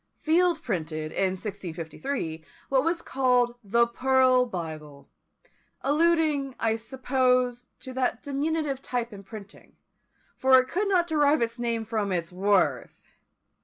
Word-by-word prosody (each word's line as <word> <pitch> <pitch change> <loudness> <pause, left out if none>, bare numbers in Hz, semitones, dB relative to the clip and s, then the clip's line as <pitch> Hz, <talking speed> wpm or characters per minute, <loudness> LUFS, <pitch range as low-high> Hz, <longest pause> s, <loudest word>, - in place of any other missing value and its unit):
Field 335 0 +2
printed, 155 -6 -3
in 190 -1 0
1653, 175 - -5 0.3
what 265 -1 +3
was 335 +1 -1
called 250 -2 +2
the 235 +4 +3
Pearl 255 +1 +3
Bible; 155 -7 -7 0.7
alluding, 300 -3 +2
I 225 -1 +1
suppose, 250 0 0
to 260 - -8
that 255 -2 -1
diminutive 285 -1 -2
type 240 -3 -3
in 200 - -9
printing, 200 0 -12 0.6
for 260 0 +5
it 255 - -1
could 400 +4 -1
not 365 -3 +3
derive 300 -4 +2
its 230 +1 -4
name 230 -2 -1
from 215 -3 -2
its 170 -2 -2
worth. 195 +1 0
250 Hz, 130 wpm, -26 LUFS, 200-275 Hz, 0.7 s, for